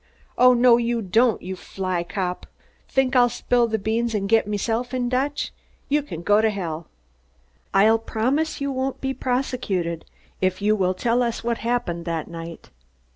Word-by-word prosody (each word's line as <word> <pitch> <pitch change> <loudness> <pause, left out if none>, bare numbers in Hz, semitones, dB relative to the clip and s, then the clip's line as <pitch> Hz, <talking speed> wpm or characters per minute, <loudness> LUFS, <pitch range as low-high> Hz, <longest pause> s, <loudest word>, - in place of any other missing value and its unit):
"Oh, 250 0 +6
no 240 -1 +6
you 235 0 0
don't, 225 +5 +2
you 190 +1 -5
fly 185 -2 -3
cop! 180 0 -4 0.4
Think 265 0 +1
I'll 245 -1 +6
spill 240 0 +1
the 220 -1 0
beans 225 +2 -1
and 195 -1 -1
get 225 0 +3
meself 225 +4 -2
in 245 -1 -1
Dutch? 280 +3 -1 0.4
You 295 +1 +3
can 170 - -8
go 205 +4 +4
to 220 - +3
hell!" 170 -6 -4 0.8
"I'll 220 +3 +5
promise 260 +8 -1
you 280 0 -2
won't 265 0 -2
be 265 0 -2
prosecuted 245 -11 -2 0.4
if 185 0 +1
you 210 +1 +2
will 185 -2 +1
tell 235 +5 +1
us 235 -2 -1
what 235 0 -1
happened 230 -8 -2
that 165 -2 -3
night." 165 0 -9
225 Hz, 170 wpm, -23 LUFS, 185-250 Hz, 0.8 s, Oh